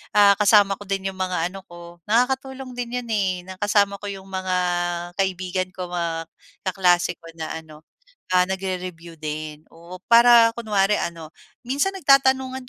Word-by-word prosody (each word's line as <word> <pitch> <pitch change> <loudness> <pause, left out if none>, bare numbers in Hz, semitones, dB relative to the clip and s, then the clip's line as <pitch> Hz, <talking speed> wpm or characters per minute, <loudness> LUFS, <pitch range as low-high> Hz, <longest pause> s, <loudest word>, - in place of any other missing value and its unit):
ah, 205 -1 +7
kasama 205 -2 +5
ko - - -9
din 195 -1 -2
'yong 190 - -15
mga 180 -2 -1
ano 195 0 -9
ko, 175 0 -13
nakakatulong 260 +3 0
din 245 0 -4
'yon 240 -1 -10
eh, 200 -3 +1 0.2
na 190 - -8
kasama 205 -1 +2
ko - - -9
'yong 195 -1 -10
mga 185 -1 -2 0.6
kaibigan 185 -1 -1
ko, 180 -2 -6
mga 165 -2 -3 0.4
kaklase 180 -2 +2
ko - - -19
na 160 -1 -5
ano, 155 -1 -15 0.5
ah, 180 0 +5
nagre-review 185 -3 -5
din, 155 0 -6
oo. 170 +2 -11
Para 235 -1 +7
kunwari 210 -3 +1
ano, 165 -2 -5 0.4
minsan 280 +10 0
nagtatanungan 265 -4 +3
190 Hz, 155 wpm, -23 LUFS, 175-230 Hz, 0.6 s, ah